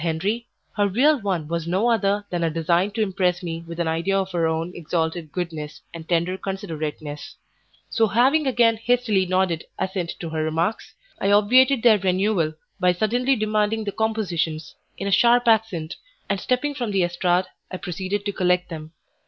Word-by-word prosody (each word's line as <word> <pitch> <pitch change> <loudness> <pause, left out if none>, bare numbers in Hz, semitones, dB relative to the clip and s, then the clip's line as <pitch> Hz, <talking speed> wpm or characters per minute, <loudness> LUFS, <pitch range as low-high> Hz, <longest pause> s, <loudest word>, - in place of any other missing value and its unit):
Henri, 195 +9 -1 0.3
her 205 -1 +2
real 260 +7 +3
one 185 -7 -2
was 170 0 -3
no 190 +7 +1
other 205 -2 +1
than 175 -1 -1
a 165 - +2
design 170 +4 +1
to 220 +1 -1
impress 180 -3 0
me 165 -1 -4
with 170 0 -7
an 170 - 0
idea 165 +5 0
of 190 -1 -1
her 170 -2 +1
own 160 +2 -2
exalted 160 -1 -2
goodness 160 -4 -5
and 165 -1 -9
tender 175 +2 0
considerateness; 155 0 -5 0.5
so 225 -2 +2
having 265 +8 +3
again 235 -3 +3
hastily 225 -4 +1
nodded 185 -3 +1
assent 190 -2 -2
to 170 - -5
her 160 -1 -2
remarks, 165 +7 -2 0.2
I 195 - +1
obviated 250 +5 +5
their 220 -4 +6
renewal 185 -3 +1 0.2
by 180 -1 +3
suddenly 245 +8 +1
demanding 215 0 0
the 205 - -3
compositions, 175 -9 -2 0.2
in 195 - -4
a - - -1
sharp 240 +4 +4
accent, 215 -8 +1 0.3
and 200 - -1
stepping 260 +4 0
from 245 -5 -3
the 195 -3 +2
estrade, 175 +1 +1 0.2
I 185 - -5
proceeded 190 +3 -4
to 205 - 0
collect 180 -1 +1
them. 160 -1 -8
190 Hz, 175 wpm, -23 LUFS, 170-220 Hz, 0.5 s, their